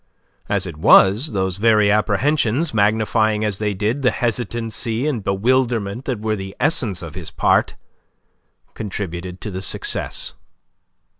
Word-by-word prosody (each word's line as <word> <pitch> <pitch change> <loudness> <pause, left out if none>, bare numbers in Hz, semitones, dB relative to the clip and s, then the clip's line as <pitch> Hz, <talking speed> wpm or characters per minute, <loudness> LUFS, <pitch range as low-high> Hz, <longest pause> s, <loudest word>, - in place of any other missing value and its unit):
As 100 -2 0
it 85 -4 -7
was, 105 - +5
those 95 -2 -1
very 105 -1 +4
apprehensions, 115 +7 +1
magnifying 110 0 +1
as 105 -3 -2
they 105 -2 -1
did 110 +8 -1
the 125 - +4
hesitancy 115 0 -2
and 130 -9 -2
bewilderment 115 +2 0
that 125 -5 -2
were 110 0 -1
the 95 -1 -7
essence 120 - 0
of 85 -3 -8
his - - -7
part, - - +1 1.0
contributed 90 -3 -6
to 105 - -5
the 95 0 -5
success. 95 - -1
105 Hz, 135 wpm, -20 LUFS, 95-120 Hz, 1.0 s, was